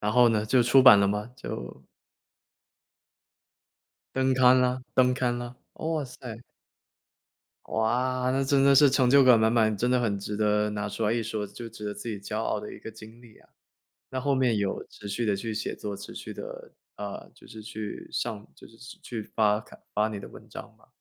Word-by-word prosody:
然 105 +1 -1
后 125 0 +6
呢， 110 -2 +1
就 125 +3 +3
出 130 +2 +5
版 125 -6 +9
了 100 - +3
嘛， 105 +1 -2
就 60 - -7 2.3
登 130 0 +2
刊 130 0 +6
了 125 0 +1
登 125 -1 +4
刊 125 -2 0
了， 120 0 -7 0.2
哇 160 -2 -2
塞。 125 -3 -9 1.3
哇， 125 +3 0
那 135 +1 +1
真 135 0 +2
的 140 0 +6
是 145 +1 +7
成 130 -2 +3
就 140 +1 +7
感 125 -3 +7
满 110 0 +3
满， 110 -2 +2
真 120 +5 0
的 125 0 +3
很 105 -4 0
值 105 +1 -5
得 105 0 +1
拿 105 0 -3
出 110 - -5
来 105 - +2
一 115 0 0
说， 110 -1 -3
就 115 +4 -9
值 110 -1 -10
得 105 - -3
自 115 - -8
己 105 -3 -4
骄 105 +2 -5
傲 110 - -1
的 105 - -8
一 - - -10
个 - - -9
经 110 +1 -14
历 115 -3 -17
啊。 - - -24 0.6
那 130 - -3
后 140 +1 +1
面 130 -4 +2
有 100 -2 -2
持 105 - -12
续 105 +4 -2
地 105 -3 +1
去 110 +3 -4
写 - - -3
作， 100 -1 -6
持 - - -10
续 - - -8
地， - - -7 0.5
呃， 100 -1 -7
就 - - -18
是 110 - -11
去 110 -1 -7
上 105 -1 -3
就 - - -14
是 115 - -19 0.3
去 115 -3 -5
发 105 0 +1
看 105 - -16
发 105 +1 +2
你 105 -2 -5
的 100 - -9
文 - - -14
章 - - -10
吗？ - - -25
115 Hz, 225 characters per minute, -27 LUFS, 105-125 Hz, 2.3 s, 版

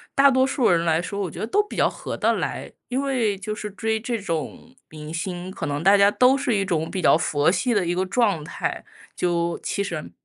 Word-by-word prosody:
大 275 0 +6
多 260 0 +3
数 265 -3 +1
人 170 -1 +3
来 160 -1 +2
说， 200 +3 -5
我 185 - -2
觉 - - -10
得 - - -1
都 415 - +3
比 420 - -9
较 - - +4
合 - - -6
得 - - +2
来。 - - -4 0.2
因 255 +2 -1
为 250 -7 0
就 215 +2 -4
是 210 0 -6
追 220 +2 -1
这 235 0 -3
种 180 - -5
明 155 0 -9
星， 175 +2 -4
可 190 - -5
能 145 +1 -2
大 195 +3 +6
家 200 +1 +5
都 255 +4 +4
是 260 -5 0
一 195 - +1
种 165 -4 -2
比 190 - -3
较 160 - +5
佛 150 -1 +1
系 235 +7 0
的 205 - +2
一 175 - 0
个 185 +1 0
状 195 -6 +1
态， - - -4 0.3
就 170 -1 -1
其 200 - -1
实 170 -6 -5
195 Hz, 260 characters per minute, -23 LUFS, 170-235 Hz, 0.3 s, 大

